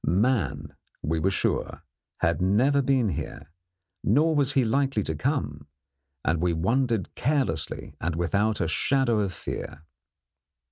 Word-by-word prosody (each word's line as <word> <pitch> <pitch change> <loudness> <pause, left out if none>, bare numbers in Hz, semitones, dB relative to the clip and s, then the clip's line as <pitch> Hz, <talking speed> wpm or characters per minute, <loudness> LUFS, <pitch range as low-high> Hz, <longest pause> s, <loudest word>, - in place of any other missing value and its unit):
Man, 85 - 0 0.3
we 80 +2 0
were 90 +5 +2
sure, 95 - -1 0.4
had 85 0 +1
never 125 +10 +3
been 130 -4 +2
here, 80 -1 -6 0.5
nor 160 +2 +3
was 145 -1 +2
he 135 - +3
likely 135 -1 +1
to 80 - -2
come, 75 - -2 0.6
and 80 +2 +1
we 90 -1 +2
wandered 115 +5 0
carelessly 130 - -1
and 85 0 -1
without 100 +5 +1
a 85 - 0
shadow 120 - +1
of 100 -3 0
fear. 80 -4 -6
105 Hz, 135 wpm, -26 LUFS, 80-135 Hz, 0.6 s, never